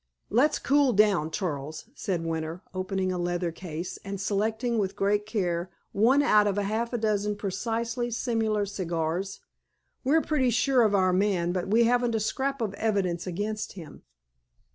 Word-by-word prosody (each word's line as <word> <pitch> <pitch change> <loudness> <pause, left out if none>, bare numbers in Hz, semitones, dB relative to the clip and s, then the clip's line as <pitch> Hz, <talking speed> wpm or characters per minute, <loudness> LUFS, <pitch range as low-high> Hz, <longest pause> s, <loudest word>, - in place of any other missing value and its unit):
"Let's 285 +8 +3
cool 280 -2 +3
down, 200 -7 +3
Charles!" 155 -4 -4
said 180 - -3
Winter, 165 +2 -3
opening 185 0 -1
a 180 - -2
leather 175 0 -1
case, 170 0 -6
and 200 -1 -5
selecting, 220 +4 0
with 195 -1 -1
great 205 +1 +1
care, 180 -5 -1 0.2
one 245 +8 +4
out 210 -6 +5
of 200 -1 0
half 220 +4 -1
a 240 - -1
dozen 210 -2 0
precisely 230 +4 -2
similar 225 -3 0
cigars. 175 -1 -3 0.6
"We're 300 +5 +4
pretty 265 -5 +1
sure 250 +2 +3
of 215 -3 +3
our 185 -2 +3
man, 185 -3 +1
but 180 -1 -2
we 225 +4 +4
haven't 240 0 +2
a - - +1
scrap 270 +5 -1
of 205 -3 -2
evidence 195 -5 -1
against 210 +4 -3
him. 165 -6 -11
205 Hz, 160 wpm, -27 LUFS, 185-230 Hz, 0.6 s, out